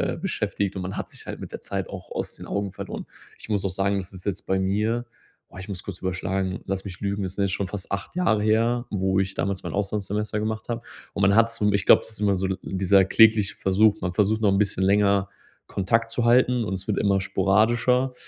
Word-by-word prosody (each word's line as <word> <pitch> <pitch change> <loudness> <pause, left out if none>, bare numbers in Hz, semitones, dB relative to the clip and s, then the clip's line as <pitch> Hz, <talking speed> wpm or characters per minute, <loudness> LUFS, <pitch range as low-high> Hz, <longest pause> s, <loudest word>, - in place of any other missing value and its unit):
äh, - - -10
beschäftigt 100 -1 -2
und 95 - -3
man 95 +2 -5
hat - - -4
sich - - -8
halt - - -6
mit - - -8
der - - -6
Zeit - - -4
auch - - -9
aus - - -4
den - - -10
Augen 100 -1 -2
verloren. 95 - -7 0.3
Ich - - -10
muss 100 -2 0
auch - - +1
sagen, 100 +2 0
das 95 0 -6
ist 90 -1 -9
jetzt 95 -2 -3
bei 95 - +1
mir 105 +5 0 0.5
oh, - - -11
ich 95 +1 -8
muss 95 -3 -6
kurz 95 -3 -7
überschlagen, 95 0 -2
lass 95 0 -3
mich 90 -3 -8
lügen, 100 0 -1
das 95 -1 -5
sind 100 - 0
jetzt 100 - 0
schon 100 0 -2
fast 100 -1 -7
8 100 +8 -4
Jahre 170 -13 +2
her, 115 +3 +2
wo 95 -1 +1
ich 95 0 -1
damals 100 -1 -2
mein - - -5
Auslandssemester 105 +1 -2
gemacht 110 +2 -3
habe. 115 0 -2 0.3
Und 100 - -2
man 100 +1 +5
hat's, 115 +1 +4
so 105 - +2
ich 100 -1 0
glaube, - - +8
es - - -8
ist 110 - -8
immer 100 -1 +3
so 95 +1 -1
l 95 0 -2
dieser 95 +1 +3
klägliche 110 0 +4
Versuch. 100 +2 +3
Man 90 -1 -3
versucht 105 +2 +2
noch 110 - +2
'n 95 - +2
bisschen 100 -1 0
länger 100 0 +3 0.4
Kontakt 115 +4 0
zu 120 - -1
halten 125 0 +4
und 105 - -3
es 95 +2 -7
wird 105 - 0
immer 100 -2 +2
sporadischer. 115 +7 +2
100 Hz, 245 wpm, -25 LUFS, 95-110 Hz, 0.5 s, glaube